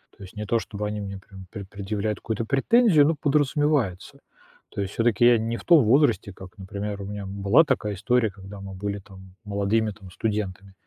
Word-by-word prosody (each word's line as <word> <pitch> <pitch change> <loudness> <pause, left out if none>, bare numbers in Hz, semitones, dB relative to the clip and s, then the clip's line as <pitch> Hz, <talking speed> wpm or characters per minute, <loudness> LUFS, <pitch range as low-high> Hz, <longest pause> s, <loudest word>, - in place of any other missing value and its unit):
То - - -13
есть 95 +3 -12
не 105 0 -5
то 115 +2 +1
чтобы 105 -1 -6
они 105 0 -4
мне 100 -1 -6
прям 95 -1 -13
пре 100 -3 -7
предъявляют 105 +2 -3
какую-то 110 0 -3
претензию, 155 - +4
но 160 - +1
подразумевается. 145 - 0 0.5
То 100 - -4
есть 95 0 -4
всё-таки 115 0 +2
я 120 -1 +7
не 115 +1 -2
в - - -11
том 165 -7 +6
возрасте, 120 -3 +3
как, 95 +3 -13
например, 100 +1 -5
у 100 - -6
меня, 105 0 -6
м, 100 +1 -7
была 100 +11 +6
такая 110 -9 -1
история, 115 +3 +1
когда 100 +1 -11
мы 95 0 -8
были 100 +1 -4
там 95 -1 -15
молодыми, 105 +2 0
там, 95 -3 -13
студентами. 100 -2 -3
105 Hz, 205 wpm, -25 LUFS, 100-120 Hz, 0.5 s, я